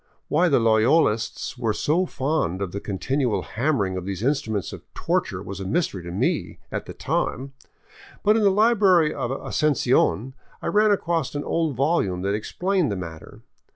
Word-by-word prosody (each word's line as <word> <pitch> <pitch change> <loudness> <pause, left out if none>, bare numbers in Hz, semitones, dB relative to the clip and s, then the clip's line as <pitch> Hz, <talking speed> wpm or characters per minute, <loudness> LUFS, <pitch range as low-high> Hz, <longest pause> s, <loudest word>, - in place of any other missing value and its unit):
Why 175 +4 +3
the 140 - +4
Loyolists 115 +1 +2
were 115 -3 0
so 175 - +1
fond 135 - -1
of 100 -3 -3
the 100 - -4
continual 125 +5 -1
hammering 110 -7 -1
of 90 - -4
these 100 +1 -4
instruments 115 - -1
of - - -8
torture - - -1
was 100 0 -7
a - - -4
mystery 100 - -1
to 85 - -8
me 90 - -1
at - - -4
the - - -7
time, 135 +2 -2 0.7
but 210 +1 +4
in 225 - +2
the 205 - +5
library 195 -6 +4
of 125 -3 -3
Asuncion 130 -3 +1 0.3
I - - -10
ran 210 +1 +4
across 165 -9 0
an 145 - -2
old 160 -5 -1
volume 120 - 0
that 100 +1 0
explained 180 - 0
the - - -1
matter. 85 -4 -9
135 Hz, 170 wpm, -24 LUFS, 100-165 Hz, 0.7 s, the